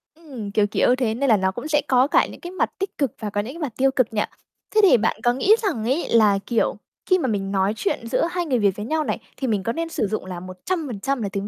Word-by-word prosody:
Ừm. 260 Hz, -11 st, -8 dB
Kiểu 205 Hz, 0 st, +2 dB
kiểu 245 Hz, +4 st, +2 dB
thế, 245 Hz, -4 st, 0 dB
nên 270 Hz, +4 st, 0 dB
là 220 Hz, -, +6 dB
nó 190 Hz, 0 st, +1 dB
cũng 240 Hz, +9 st, -6 dB
sẽ 295 Hz, -1 st, +2 dB
có 255 Hz, 0 st, +4 dB
cả -, -, +4 dB
những -, -, -12 dB
cái 350 Hz, 0 st, -7 dB
mặt 375 Hz, -, 0 dB
tích 390 Hz, 0 st, -4 dB
cực 275 Hz, -6 st, 0 dB
và 215 Hz, -, -3 dB
có 205 Hz, 0 st, -1 dB
những 240 Hz, +7 st, -7 dB
cái 335 Hz, -, -10 dB
mặt 275 Hz, -7 st, -3 dB
tiêu 270 Hz, +1 st, +3 dB
cực 255 Hz, -4 st, 0 dB
nhỉ? 210 Hz, -, +1 dB, 0.5 s
Thế 430 Hz, -, +6 dB
thì 375 Hz, -, +7 dB
bạn 225 Hz, 0 st, 0 dB
có 240 Hz, -, +3 dB
nghĩ 385 Hz, -, +4 dB
rằng 320 Hz, -, -1 dB
ấy 270 Hz, +8 st, 0 dB
là, 210 Hz, -4 st, +4 dB
kiểu, 235 Hz, -, 0 dB, 0.3 s
khi 370 Hz, -1 st, +3 dB
mà 265 Hz, -, -1 dB
mình 195 Hz, -4 st, -2 dB
nói 195 Hz, +1 st, +1 dB
chuyện 220 Hz, +2 st, -2 dB
giữa 235 Hz, -, +1 dB
hai 350 Hz, -1 st, -1 dB
người 255 Hz, -6 st, +1 dB
Việt 200 Hz, -3 st, +2 dB
với 210 Hz, -, -4 dB
nhau 310 Hz, +5 st, 0 dB
này, -, -, -2 dB, 0.2 s
thì 265 Hz, -, -2 dB
mình 210 Hz, -5 st, 0 dB
có 230 Hz, +4 st, -1 dB
nên 330 Hz, 0 st, -3 dB
sử 220 Hz, -, -1 dB
dụng 215 Hz, 0 st, -3 dB
là 180 Hz, -2 st, -6 dB
100% 245 Hz, -, -3 dB
là 205 Hz, -, -2 dB
tiếng 200 Hz, +1 st, -4 dB
240 Hz, 290 wpm, -23 LUFS, 205-295 Hz, 0.5 s, thì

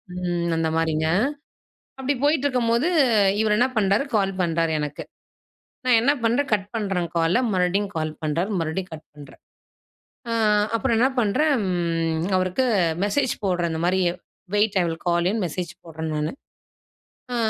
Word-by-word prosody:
ம் 175 Hz, -2 st, -1 dB
அந்த 160 Hz, -1 st, 0 dB
மாரிங்க. 160 Hz, -1 st, 0 dB, 0.9 s
அப்படி 265 Hz, +2 st, -1 dB
போயிட்டுருக்கும்போது 260 Hz, -3 st, +2 dB, 0.5 s
இவரு 210 Hz, -1 st, +2 dB
என்ன 250 Hz, +2 st, +3 dB
பண்ணுறாரு? 200 Hz, +6 st, +2 dB
கால் 195 Hz, -2 st, +2 dB
பண்ணுறாரு 165 Hz, -1 st, 0 dB
எனக்கு. 150 Hz, -1 st, -4 dB, 0.8 s
நான் 245 Hz, -2 st, +5 dB
என்ன 275 Hz, +4 st, +4 dB
பண்றேன்? 250 Hz, +5 st, +1 dB
கட் 200 Hz, -1 st, 0 dB
பண்றேன் 195 Hz, -5 st, -1 dB
கால, 165 Hz, +1 st, +2 dB, 0.2 s
மறுபடியும் 185 Hz, +2 st, +1 dB
கால் 155 Hz, -1 st, -1 dB
பண்றார், 165 Hz, +6 st, -1 dB
மறுபடியும் 165 Hz, +3 st, -3 dB
கட் 155 Hz, 0 st, -11 dB
பண்றேன். 145 Hz, -2 st, -14 dB, 0.9 s
ஆ -, -, -1 dB, 0.4 s
அப்பறம், 225 Hz, +1 st, +1 dB
என்ன 260 Hz, +2 st, +4 dB
பண்றேன்! 285 Hz, +8 st, +2 dB
ம் 165 Hz, -2 st, -1 dB
அவருக்கு 185 Hz, +8 st, 0 dB, 0.4 s
மெசேஜ் 245 Hz, +5 st, +1 dB
போட்றேன், 175 Hz, -3 st, 0 dB
இந்த 160 Hz, 0 st, -3 dB
மாதிரி 185 Hz, +1 st, +2 dB, 0.6 s
வெயிட்! 205 Hz, -1 st, +2 dB
ஐ -, -, +2 dB
வில் 165 Hz, 0 st, -4 dB
கால் 170 Hz, 0 st, +2 dB
யூன்னு 215 Hz, -1 st, -1 dB
மெசேஜ் 175 Hz, +2 st, -4 dB
போடுறேன் 160 Hz, -1 st, -5 dB
நானு. 150 Hz, +1 st, -1 dB, 1.0 s
ஆ -, -, -1 dB
180 Hz, 145 wpm, -23 LUFS, 165-225 Hz, 1.0 s, நான்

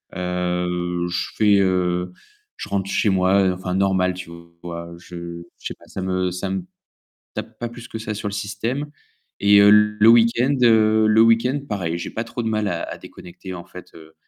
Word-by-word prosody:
Heu, 90 Hz, -1 st, -2 dB
je 85 Hz, -1 st, -2 dB
fais 105 Hz, -2 st, +4 dB
heu, 90 Hz, -1 st, 0 dB, 0.5 s
je -, -, -6 dB
rentre 100 Hz, -1 st, -2 dB
chez 105 Hz, -, +2 dB
moi, 95 Hz, +1 st, +3 dB
heu, 90 Hz, -, +1 dB
enfin 90 Hz, 0 st, -4 dB
normal, 95 Hz, -1 st, +2 dB
tu 90 Hz, -2 st, -9 dB, 0.3 s
vois. 85 Hz, -1 st, -7 dB
Je 85 Hz, -1 st, -8 dB, 0.2 s
je -, -, -20 dB
sais -, -, -6 dB
pas, -, -, -20 dB
ça 95 Hz, -, -6 dB
me 95 Hz, -1 st, -1 dB
ça 90 Hz, +2 st, -4 dB
me 95 Hz, -1 st, -3 dB, 0.7 s
tape -, -, -7 dB
pas 120 Hz, -, -3 dB
plus 120 Hz, 0 st, -11 dB
que 110 Hz, -, -6 dB
ça 110 Hz, -1 st, -4 dB
sur 105 Hz, 0 st, -4 dB
le -, -, -6 dB
système. 105 Hz, +8 st, -3 dB, 0.5 s
Et 100 Hz, 0 st, +6 dB
heu, 100 Hz, 0 st, +7 dB
le 105 Hz, +1 st, +5 dB
week-end, 115 Hz, +3 st, +4 dB
heu, 110 Hz, -2 st, +5 dB
le 110 Hz, +1 st, +5 dB
week-end 115 Hz, +4 st, +3 dB
pareil, 85 Hz, -5 st, -2 dB
j'ai 85 Hz, -, -5 dB
pas 115 Hz, -, -3 dB
trop 120 Hz, +1 st, -5 dB
de -, -, 0 dB
mal 110 Hz, -2 st, 0 dB
à 85 Hz, -3 st, -2 dB
à -, -, -7 dB
déconnecter, 90 Hz, +1 st, -11 dB
en 85 Hz, -1 st, -8 dB
fait, 90 Hz, -1 st, -12 dB
heu, 80 Hz, -1 st, -15 dB
95 Hz, 200 wpm, -22 LUFS, 90-110 Hz, 0.7 s, heu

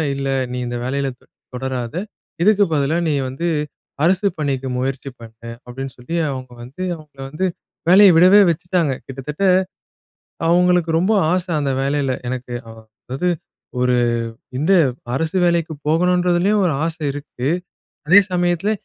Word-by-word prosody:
"இல்ல 135 Hz, 0 st, -3 dB, 0.2 s
நீ 125 Hz, -, -4 dB
இந்த 120 Hz, 0 st, -3 dB
வேலையில 140 Hz, +2 st, -1 dB
தொ -, -, -25 dB, 0.3 s
தொடராத, 125 Hz, 0 st, -4 dB, 0.5 s
இதுக்கு 205 Hz, +2 st, +5 dB
பதிலா 145 Hz, +2 st, +1 dB
நீ 155 Hz, -, +1 dB, 0.2 s
வந்து 135 Hz, +7 st, -3 dB, 0.6 s
அரசு 185 Hz, +4 st, +2 dB
பணிக்கு 135 Hz, -3 st, -1 dB
முயற்சி 135 Hz, +1 st, -3 dB
பண்ணு." 115 Hz, 0 st, -11 dB, 0.2 s
அப்படீன்னு 130 Hz, +2 st, -7 dB
சொல்லி 125 Hz, +7 st, -6 dB
அவுங்க 130 Hz, -2 st, -6 dB
வந்து, 135 Hz, +10 st, -7 dB
அவுங்கள 150 Hz, -3 st, -16 dB
வந்து 155 Hz, +7 st, -2 dB, 0.4 s
வேலைய 195 Hz, +2 st, +8 dB
விடவே 185 Hz, +5 st, +7 dB
வச்சுட்டாங்க. 170 Hz, -2 st, 0 dB
கிட்டத்தட்ட 135 Hz, +6 st, -6 dB, 1.1 s
அவுங்களுக்கு 175 Hz, -1 st, +3 dB
ரொம்ப 185 Hz, +6 st, +2 dB, 0.2 s
ஆசை 180 Hz, 0 st, -1 dB
அந்த 140 Hz, -2 st, 0 dB
வேலையில. 140 Hz, -1 st, 0 dB, 0.2 s
எனக்கு 125 Hz, 0 st, -5 dB, 0.2 s
அ -, -, -9 dB
அ -, -, -18 dB, 0.3 s
அதாவது, 135 Hz, +8 st, -1 dB, 0.5 s
ஒரு 125 Hz, 0 st, +2 dB, 0.6 s
இந்த 155 Hz, +8 st, +2 dB, 0.4 s
அரசு 160 Hz, +6 st, -1 dB
வேலைக்கு 170 Hz, -2 st, +1 dB
போகணுன்றதுலேயும் 180 Hz, +4 st, +2 dB
ஒரு 170 Hz, -, +1 dB
ஆசை 165 Hz, 0 st, -4 dB
இருக்கு. 140 Hz, -2 st, -5 dB, 0.6 s
அதே 190 Hz, +6 st, +8 dB
சமயத்தில 175 Hz, +2 st, +1 dB
155 Hz, 135 wpm, -20 LUFS, 130-180 Hz, 1.1 s, வேலைய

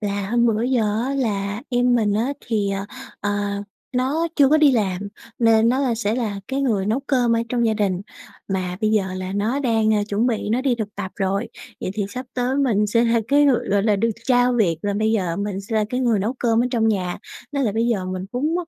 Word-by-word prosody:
là 200 Hz, -2 st, -2 dB
hôm 235 Hz, 0 st, +3 dB
bữa 225 Hz, -1 st, +1 dB
giờ 250 Hz, -2 st, +1 dB, 0.2 s
á, 275 Hz, -, -2 dB
là 205 Hz, -4 st, -2 dB
em 245 Hz, 0 st, +2 dB
mình 215 Hz, -4 st, +2 dB
á 235 Hz, +6 st, 0 dB
thì, 210 Hz, -4 st, 0 dB
ờ, 195 Hz, 0 st, -3 dB, 0.4 s
ờ, 205 Hz, -, -1 dB, 0.6 s
nó 290 Hz, +7 st, 0 dB
chưa 280 Hz, -3 st, +6 dB
có 305 Hz, -, +5 dB
đi 295 Hz, -3 st, +5 dB
làm, 200 Hz, -3 st, -1 dB, 0.3 s
nên 225 Hz, -1 st, +4 dB
nó 255 Hz, +3 st, +2 dB
là 255 Hz, -4 st, +1 dB
sẽ 220 Hz, -1 st, -1 dB
là 215 Hz, -5 st, -2 dB
cái 270 Hz, +1 st, -1 dB
người 215 Hz, -8 st, 0 dB
nấu 225 Hz, +5 st, 0 dB
cơm 245 Hz, -4 st, +2 dB
ở -, -, +1 dB
trong 235 Hz, 0 st, +1 dB
gia 220 Hz, -, +2 dB
đình. 195 Hz, -4 st, 0 dB, 0.5 s
Mà 185 Hz, -2 st, -2 dB
bây 215 Hz, -, +2 dB
giờ 215 Hz, -3 st, +2 dB
là 185 Hz, 0 st, -4 dB
nó 215 Hz, +7 st, 0 dB
đang, 225 Hz, -4 st, +2 dB
à, 205 Hz, -, +1 dB
chuẩn 210 Hz, +4 st, +1 dB
bị 225 Hz, -4 st, -1 dB
nó 235 Hz, +3 st, +1 dB
đi 260 Hz, -2 st, +1 dB
thực 215 Hz, -3 st, -5 dB
tập 195 Hz, -2 st, -5 dB
rồi, 195 Hz, +3 st, -1 dB, 0.3 s
vậy -, -, -3 dB
thì 210 Hz, -, -1 dB
sắp 250 Hz, +5 st, -6 dB
tới 250 Hz, +1 st, 0 dB
mình 225 Hz, -7 st, +2 dB
sẽ 230 Hz, +3 st, +2 dB
là 230 Hz, 0 st, +2 dB
cái 290 Hz, +1 st, +5 dB
người, 250 Hz, -4 st, +2 dB
gọi 200 Hz, 0 st, +3 dB
là, 210 Hz, -2 st, +2 dB
được 230 Hz, +3 st, +1 dB, 0.2 s
trao 250 Hz, -1 st, +4 dB
việc 195 Hz, -9 st, +2 dB
là 205 Hz, -, 0 dB
bây 220 Hz, 0 st, +1 dB
giờ 180 Hz, -6 st, 0 dB
mình 200 Hz, -1 st, -3 dB
sẽ 210 Hz, +3 st, -3 dB
là 215 Hz, -, +2 dB
cái 250 Hz, -, -1 dB
người 235 Hz, -4 st, +2 dB
nấu 210 Hz, +5 st, -1 dB
cơm 230 Hz, -1 st, +2 dB
ở -, -, +1 dB
trong 225 Hz, -3 st, +2 dB
nhà. 185 Hz, -4 st, -1 dB, 0.3 s
Nên 280 Hz, -1 st, 0 dB
là 220 Hz, -6 st, +1 dB
bây 225 Hz, +2 st, +1 dB
giờ 215 Hz, -6 st, 0 dB
mình 185 Hz, 0 st, -4 dB
cũng, 295 Hz, +6 st, 0 dB
225 Hz, 245 wpm, -22 LUFS, 205-245 Hz, 0.6 s, chưa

